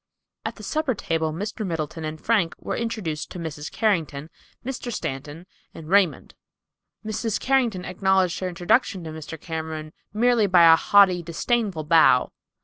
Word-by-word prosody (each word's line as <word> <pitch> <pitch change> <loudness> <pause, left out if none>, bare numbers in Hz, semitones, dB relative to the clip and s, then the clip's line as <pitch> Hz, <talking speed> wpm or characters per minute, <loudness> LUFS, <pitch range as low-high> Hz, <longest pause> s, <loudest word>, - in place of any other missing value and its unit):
At - - -4
the - - -12
supper 305 -5 -1
table 160 -4 -1
Mr. 205 +7 -4
Middleton 165 -3 -4
and 155 0 -5
Frank 205 -6 +1
were - - -4
introduced 210 -10 -3
to - - -8
Mrs. 155 -3 -6
Carrington, 165 -8 -1 0.3
Mr. 250 -2 -4
Stanton 150 - -5 0.3
and 160 -1 -10
Raymond. 190 -7 +2 0.7
Mrs. 220 0 -2
Carrington 240 -9 +1
acknowledged 190 -1 +1
her 185 - -2
introduction 180 +2 +1
to 160 - -6
Mr. 160 0 -8
Cameron 160 -1 -6 0.2
merely 230 0 +3
by 180 -2 +5
a 165 -1 +9
haughty, 190 0 +4
disdainful 180 +1 -1
bow. 155 -5 +4
175 Hz, 145 wpm, -24 LUFS, 160-215 Hz, 0.7 s, a